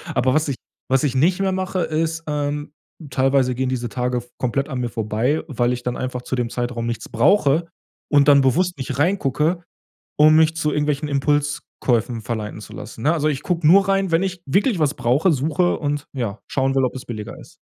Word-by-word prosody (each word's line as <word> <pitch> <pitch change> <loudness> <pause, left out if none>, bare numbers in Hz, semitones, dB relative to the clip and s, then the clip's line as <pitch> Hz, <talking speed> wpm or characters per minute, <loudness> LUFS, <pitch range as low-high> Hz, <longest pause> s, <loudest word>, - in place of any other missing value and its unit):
Aber 130 +1 +2
was 155 +2 +1
ich 140 - -1 0.3
was 135 0 +2
ich 140 -3 +1
nicht 170 +8 +3
mehr 195 -1 +1
mache, 185 0 -2
ist 165 0 -1
ähm, 145 0 -3 0.4
teilweise 130 -1 +2
gehen 130 +1 -1
diese 120 -2 -2
Tage 125 +3 -1
f 120 0 -5
komplett 135 +2 -1
an 130 -3 -3
mir 120 -1 -2
vorbei, 115 +6 -1
weil 125 -5 0
ich 125 0 -6
dann 125 0 -2
einfach 125 -1 -4
zu 130 - -3
dem 120 -2 -1
Zeitraum 120 -1 -3
nichts 115 -1 -4
brauche 150 - +3 0.4
und 145 -1 +5
dann 140 -1 +7
bewusst 175 +7 +1
nicht 135 0 -4
reingucke, 165 0 +1 0.5
um 155 +1 +6
mich 160 0 +4
zu 155 -2 0
irgendwelchen 150 0 -1
Impulskäufen 140 -5 0
verleiten 105 0 -4
zu - - -12
lassen, 110 +2 -9
ne? 155 +6 +3
Also, 155 -2 +1
ich 140 -3 -2
gucke 170 -3 -1
nur 195 +4 +6
rein, 195 -1 +1
wenn 165 - +3
ich 185 -2 -3
wirklich 195 - +2
was 150 -2 +1
brauche, 130 +10 +2
suche 155 +5 +1
und 145 -1 -2
ja, 115 -6 -3
schauen 135 0 0
will, 135 - +3
ob 125 - -1
es 130 - -7
billiger 110 -2 -7
ist. - - -15
140 Hz, 205 wpm, -21 LUFS, 125-160 Hz, 0.5 s, dann